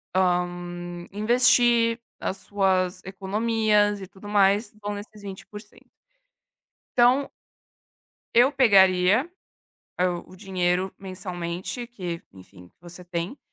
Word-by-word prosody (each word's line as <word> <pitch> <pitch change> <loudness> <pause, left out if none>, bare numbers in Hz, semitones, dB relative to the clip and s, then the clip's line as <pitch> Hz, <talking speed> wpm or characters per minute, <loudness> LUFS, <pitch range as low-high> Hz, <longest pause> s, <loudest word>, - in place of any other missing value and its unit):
hã, 175 -1 -1
investir 235 +2 +3 0.2
as 190 - -3
suas 190 -2 0
economias 210 +2 +1
e 190 - -7
tudo 195 +2 -13
mais, 205 +1 +3
vão 205 0 -4
nesses 205 +1 -9
20%. 210 +2 -11 1.1
Então 250 +3 +4 1.0
eu 245 +4 +6
pegaria, 200 - +4 0.7
hã, 180 -1 +1
o 185 - -15
dinheiro 185 -1 -1
mensalmente 185 +3 -5
que, 180 -8 -6
enfim, 90 -1 -16
você 175 +1 -11
tem, 175 +8 -5
195 Hz, 100 wpm, -25 LUFS, 180-215 Hz, 1.1 s, eu